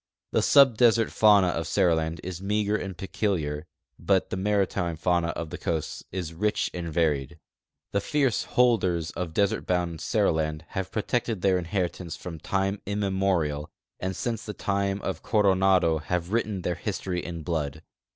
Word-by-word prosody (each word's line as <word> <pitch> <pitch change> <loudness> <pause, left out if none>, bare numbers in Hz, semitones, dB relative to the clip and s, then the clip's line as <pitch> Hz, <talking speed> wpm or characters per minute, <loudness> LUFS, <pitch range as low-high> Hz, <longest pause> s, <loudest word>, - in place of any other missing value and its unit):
'I'he - - +3
subdesert 120 -4 +5
fauna 100 -4 +5
of 85 -1 -2
Seriland 80 -3 +1
is 90 0 -6
meager 105 +1 0
and 95 -4 -4
peculiar, 85 -6 -2 0.3
but 95 -2 +1
the - - -1
maritime 95 -3 0
fauna 85 +1 +1
of 85 -1 -4
the 90 - -6
coasts 80 -2 -3
is 90 -3 -4
rich 105 +5 0
and 85 -2 -4
varied. 75 -5 0 0.5
The 100 - +1
fierce 135 -2 +1
holders 95 -10 +2
of 85 -3 -5
desert 100 +1 +1
bouml 90 -2 0
Seriland 80 -1 0
have 95 -1 -3
]>rotected 110 0 -1
their 95 -1 +3
inheritance 90 -1 -3
from 85 -3 -8
time 95 +4 -1
immemorial, 95 -7 0 0.3
and 95 0 -3
since 115 +1 -3
the 105 - -6
time 100 0 -1
of 90 -4 -3
Coronado 95 -5 +3
have 90 +3 -3
written 105 -5 -1
their 90 - 0
history 90 -1 -3
in 85 -2 -6
blood. 80 -2 -3
90 Hz, 150 wpm, -26 LUFS, 85-100 Hz, 0.5 s, subdesert